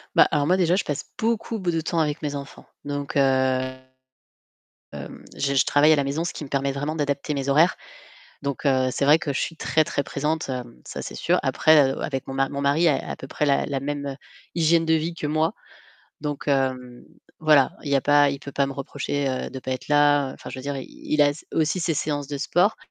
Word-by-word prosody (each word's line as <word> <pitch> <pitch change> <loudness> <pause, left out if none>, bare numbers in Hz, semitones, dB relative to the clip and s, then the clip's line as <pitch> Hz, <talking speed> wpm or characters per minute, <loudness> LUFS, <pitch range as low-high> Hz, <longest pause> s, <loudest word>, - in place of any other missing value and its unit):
Bah, - - +7
alors 145 -1 +1
moi 185 +1 +3
déjà, 180 -1 +3
je 200 - 0
passe 145 - -4
beaucoup 225 0 -1
b 180 -2 -2
de 165 -1 0
temps 165 +1 -1
avec 150 -1 0
mes 145 -1 -3
enfants. 140 0 -9 0.2
Donc, 145 -1 -4
heu, - - +5
hem, 130 -1 0 1.3
je 140 0 0
je 135 - +4
travaille 150 +2 +5
à - - +5
la 140 - +1
maison, 145 +5 -2
ce - - -3
qui 150 - -7
me - - -10
permet 140 0 0
vraiment 145 +3 -3
d'adapter 145 0 -1
mes 140 0 -3
horaires, 155 +6 +4 0.7
donc 140 +1 -4
heu, 130 -2 +3
c'est 140 - 0
vrai 150 +3 +7
que 140 -4 -3
je - - -1
suis 165 - -3
très 155 - +2
très 140 - -2
présente, 150 +2 -2
hem, 125 -2 -6
ça - - -6
c'est - - -7
sûr. - - +1
Après, 150 -4 +4
heu, - - -7
avec 135 -3 -3
mon 135 - -5
ma 135 0 +1
mon 140 0 -4
mari 145 +5 +3
a 145 - 0
à - - -3
peu 135 - -10
près 150 - -1
la 140 -1 +2
la 140 -2 -2
même, 140 0 -4
heu, 135 - -4 0.4
hygiène 165 0 +3
de 160 - +3
vie 160 +2 0
que 155 -3 -4
moi, 155 +2 +1 0.7
donc 145 -1 -4
hem, 130 -3 -1 0.4
voilà, 150 -4 +4
il 145 - -5
y 140 - +4
a - - +2
pas 145 0 +4
il 140 - -4
peut 140 -1 -9
pas 140 -1 +1
me 135 - -4
reprocher, 140 0 -3
heu, 130 -1 -3
de 130 - -6
pas 130 0 -4
être 130 - -6
là, 145 -2 +3
enfin - - -10
je 130 - -7
veux - - -7
dire 140 0 -3
i 130 - -6
il 150 - -2
a 145 - +5
s 145 - -9
aussi 160 +3 +1
ses 165 -1 0
séances 145 -1 -2
de 145 -1 -4
sport 180 +8 +2
145 Hz, 245 wpm, -24 LUFS, 135-155 Hz, 1.3 s, Bah